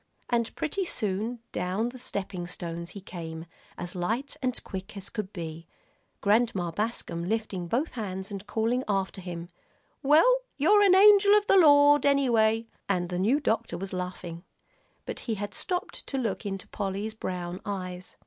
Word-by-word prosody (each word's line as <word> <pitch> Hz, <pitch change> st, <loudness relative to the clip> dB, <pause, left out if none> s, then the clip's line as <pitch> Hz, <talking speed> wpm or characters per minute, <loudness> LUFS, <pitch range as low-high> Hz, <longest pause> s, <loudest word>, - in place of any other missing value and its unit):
And 235 Hz, -1 st, +1 dB
pretty 385 Hz, +6 st, -1 dB
soon 220 Hz, -, -2 dB
down 190 Hz, +6 st, -1 dB
the 255 Hz, +1 st, -10 dB
stepping 190 Hz, -7 st, -4 dB
stones 170 Hz, -1 st, -5 dB
he -, -, -7 dB
came, 165 Hz, -3 st, -7 dB, 0.3 s
as 175 Hz, 0 st, -5 dB
light 225 Hz, +12 st, -2 dB
and 255 Hz, -2 st, -1 dB
quick 190 Hz, +1 st, -7 dB
as 195 Hz, 0 st, -6 dB
could 210 Hz, -3 st, -4 dB
be, 165 Hz, -3 st, -7 dB, 0.5 s
Grandma 205 Hz, -5 st, +2 dB
Bascom 170 Hz, -4 st, -2 dB
lifting 215 Hz, -5 st, -2 dB
both 260 Hz, -, 0 dB
hands 195 Hz, -3 st, -5 dB
and 200 Hz, 0 st, -6 dB
calling 230 Hz, +4 st, 0 dB
after 195 Hz, -2 st, -1 dB
him, 175 Hz, -1 st, -6 dB, 0.5 s
"Well, 310 Hz, -, +6 dB, 0.2 s
you're 395 Hz, +9 st, +5 dB
an 390 Hz, -2 st, +6 dB
angel 405 Hz, +1 st, +8 dB
of 415 Hz, -, +1 dB
the 390 Hz, -, +5 dB
Lord, 290 Hz, -4 st, +7 dB
anyway," 230 Hz, -5 st, +3 dB, 0.2 s
and 180 Hz, -3 st, 0 dB
the 180 Hz, -1 st, -2 dB
new 230 Hz, +10 st, +3 dB
doctor 225 Hz, -, -1 dB
was 190 Hz, +2 st, -6 dB
laughing. 180 Hz, -2 st, -5 dB, 0.6 s
But -, -, -5 dB
he 225 Hz, -, +1 dB
had 205 Hz, 0 st, -5 dB
stopped 365 Hz, +2 st, -3 dB
to 270 Hz, -, -3 dB
look 225 Hz, -4 st, -2 dB
into 195 Hz, -1 st, -5 dB
Polly's 200 Hz, +2 st, -3 dB
brown 180 Hz, -4 st, -4 dB
eyes. 185 Hz, -3 st, -5 dB
205 Hz, 160 wpm, -28 LUFS, 180-255 Hz, 0.6 s, angel